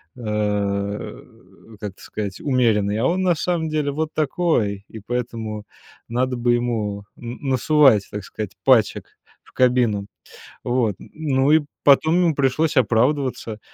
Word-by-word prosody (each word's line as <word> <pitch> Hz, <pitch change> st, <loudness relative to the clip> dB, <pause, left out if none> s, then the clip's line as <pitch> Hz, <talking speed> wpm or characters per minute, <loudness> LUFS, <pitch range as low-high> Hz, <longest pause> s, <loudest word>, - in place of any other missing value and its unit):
э, 125 Hz, -, -12 dB
о, 105 Hz, -, -4 dB
как 105 Hz, -2 st, -5 dB
это -, -, -20 dB
сказать, 100 Hz, -3 st, -5 dB
умеренный, 110 Hz, -7 st, +1 dB
а 120 Hz, -, +2 dB
он 185 Hz, +2 st, 0 dB
на 180 Hz, -1 st, +3 dB
самом 165 Hz, 0 st, -1 dB
деле 155 Hz, -2 st, -1 dB
вот 155 Hz, +2 st, -3 dB
такой, 135 Hz, -, 0 dB
и 110 Hz, -, -10 dB
поэтому 115 Hz, -1 st, -4 dB, 0.4 s
надо 125 Hz, +2 st, -1 dB
бы 120 Hz, 0 st, +2 dB
ему 110 Hz, -4 st, -2 dB
н 120 Hz, +1 st, -8 dB
насовать, 135 Hz, -4 st, +4 dB
так 105 Hz, -1 st, -5 dB
сказать, 105 Hz, 0 st, -6 dB
пачек 120 Hz, -6 st, +3 dB, 0.4 s
в -, -, -22 dB
кабину. 120 Hz, -5 st, +2 dB, 0.6 s
Вот, 120 Hz, -5 st, 0 dB
н -, -, -13 dB
ну 140 Hz, -3 st, +1 dB
и 155 Hz, +1 st, +6 dB, 0.2 s
потом 155 Hz, +3 st, +5 dB
ему 175 Hz, -3 st, +2 dB
пришлось 140 Hz, +3 st, +1 dB
оправдываться. 125 Hz, -1 st, +1 dB
120 Hz, 145 wpm, -22 LUFS, 105-145 Hz, 0.6 s, и